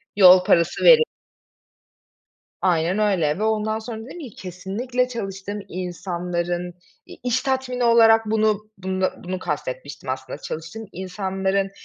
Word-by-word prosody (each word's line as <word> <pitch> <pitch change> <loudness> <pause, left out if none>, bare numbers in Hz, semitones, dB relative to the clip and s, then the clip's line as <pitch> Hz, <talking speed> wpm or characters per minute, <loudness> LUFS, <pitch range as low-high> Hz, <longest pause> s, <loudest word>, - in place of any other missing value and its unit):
Yol 185 -2 +8
parası 170 -2 +2
veri 485 -2 +9 1.6
Aynen 175 +2 +2
öyle 185 -7 +1
ve - - -3
ondan 220 0 0
sonra 220 0 -7
dedim 350 - -9
ki 260 -7 -8
kesinlikle 205 +8 -3
çalıştığım 200 -3 -5
insanların, 175 -1 -3 0.3
iii, - - -13
iş 250 0 +1
tatmini 260 -2 -1
olarak 225 -1 +6
bunu, 215 -1 +1
bunda, 185 0 -2
bunu 185 +1 -3
kast 150 -6 -3
etmiştim 130 +1 -7
aslında. 130 +2 -5
Çalıştığım 165 +10 -7
insanların 190 +1 -2
195 Hz, 125 wpm, -23 LUFS, 180-220 Hz, 1.6 s, veri